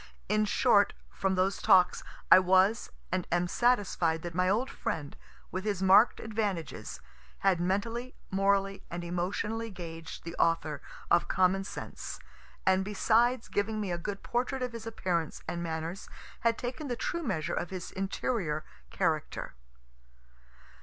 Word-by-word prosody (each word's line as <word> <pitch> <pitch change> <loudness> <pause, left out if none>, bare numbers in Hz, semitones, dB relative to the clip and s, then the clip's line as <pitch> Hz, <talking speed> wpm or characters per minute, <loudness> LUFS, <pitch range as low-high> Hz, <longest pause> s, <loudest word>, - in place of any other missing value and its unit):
In 215 0 +2
short, 205 -1 +4 0.2
from 195 -1 0
those 190 +2 +1
talks, 190 -4 +5 0.3
I - - +11
was 190 +4 +3 0.2
and 185 -1 -1
am 175 +1 +2
satisfied 190 -8 +1
that 175 -1 -5
my 180 +2 +2
old 230 +7 +2
friend, 150 - -4 0.4
with 185 +1 -3
his 200 -3 -1
mark'd 200 +5 +6
advantages, 195 - -3 0.4
had 190 -3 +3
mentally, 225 +7 -1 0.2
morally 195 0 +2
and 175 +1 -5
emotionally 200 +6 -2
gauged 165 -4 -8
the 170 0 -6
author 155 -3 +1 0.3
of 175 - +4
"Common 190 +1 +2
Sense," - - -7 0.5
and 190 0 +4
besides 230 +4 +2
giving 215 +2 -1
me 200 -4 -2
a 175 - -2
good 200 +3 -5
portrait 255 +2 -1
of 250 -1 -3
his 230 -1 -7
appearance 175 -7 -2
and 170 - -3
manners, 165 +2 -4 0.3
had 230 -1 +2
taken 255 +5 -4
the 245 - -1
true 340 +7 -2
measure 160 - -2
of 175 - -2
his 185 -2 -6
interior 190 -4 -2 0.2
character. 160 -5 -1
190 Hz, 145 wpm, -30 LUFS, 175-220 Hz, 0.5 s, I